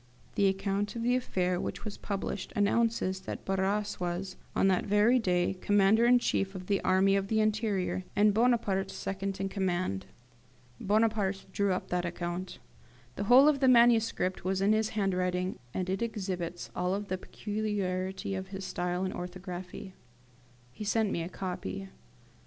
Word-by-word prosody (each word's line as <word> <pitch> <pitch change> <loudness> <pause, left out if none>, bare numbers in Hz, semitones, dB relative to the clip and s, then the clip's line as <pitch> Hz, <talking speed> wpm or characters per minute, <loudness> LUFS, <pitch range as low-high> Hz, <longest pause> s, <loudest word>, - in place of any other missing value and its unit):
The 200 - +3
account 195 +2 -1
of 230 - -3
the 245 +1 +3
affair 185 -7 0
which - - -5
was 210 - -4
published 200 -1 -4
announces 205 -2 +1
that 190 - -7
Barras 195 +2 0
was, 180 +1 -3 0.2
on - - +3
that 185 -2 +2
very 210 +5 +4
day, 180 -4 +1
Commander 205 +3 +4
in 245 0 +7
chief 195 -5 0
of 185 -1 -6
the 200 +1 +1
Army 190 +1 +3
of 195 0 0
the 220 +1 +1
Interior, 215 -4 0
and 210 0 +4
Bonaparte 215 -4 +2
second 195 0 -4
in 195 - -1
command. 185 - -2 0.7
Bonaparte 210 -2 +1
drew 200 -1 +1
up 185 - -2
that 180 0 0
account. 175 +1 -4 0.6
The 200 - -3
whole 255 +6 +7
of 300 -2 +4
the 265 - +3
manuscript 230 -6 +4
was 190 +1 0
in 200 +2 +3
his 220 0 +1
handwriting, 185 -2 0
and 185 +5 -2
it 190 +2 -2
exhibits 185 -6 -4
all 180 +2 0
the 190 -3 -4
peculiarity 195 -3 -3
of 190 0 -4
his 195 0 -6
style 180 -1 -2
and 185 - -3
orthography. 180 +1 -7 0.8
He 210 - -8
sent 210 0 +1
me 170 - -1
a 165 - -4
copy. 95 - -5
195 Hz, 160 wpm, -30 LUFS, 185-210 Hz, 0.8 s, in